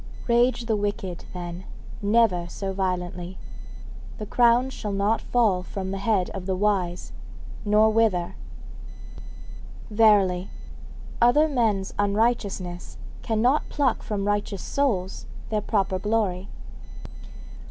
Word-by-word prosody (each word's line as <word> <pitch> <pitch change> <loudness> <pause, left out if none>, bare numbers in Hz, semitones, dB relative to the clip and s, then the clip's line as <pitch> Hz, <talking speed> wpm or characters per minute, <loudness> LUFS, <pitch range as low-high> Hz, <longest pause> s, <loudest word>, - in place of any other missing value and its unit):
Rage 240 0 +3
the 225 -2 +1
wicked, 205 -3 -3
then, 175 0 -6 0.4
never 205 -5 +2
so 195 +2 -4
violently, 180 -1 -3 0.8
the 215 - -5
crown 240 +4 +3
shall 210 -5 -5
not 200 +3 +1
fall 215 -7 +2
from 190 +1 -5
the 195 - -3
head 200 -3 +1
of 190 -1 -6
the 190 - 0
wise, 185 -3 -1 0.5
nor 210 +1 +5
wither. 215 -6 +1 1.6
Verily, 200 -4 +4 0.7
other 245 +6 +5
men's 220 -9 0
unrighteousness 200 -4 -1 0.2
cannot 240 +6 +1
pluck 280 -3 +1
from 200 -2 -3
righteous 205 -2 -1
souls 205 -10 -1 0.2
their 215 -1 0
proper 195 -3 0
glory. 205 -3 -1
205 Hz, 110 wpm, -25 LUFS, 185-225 Hz, 1.6 s, nor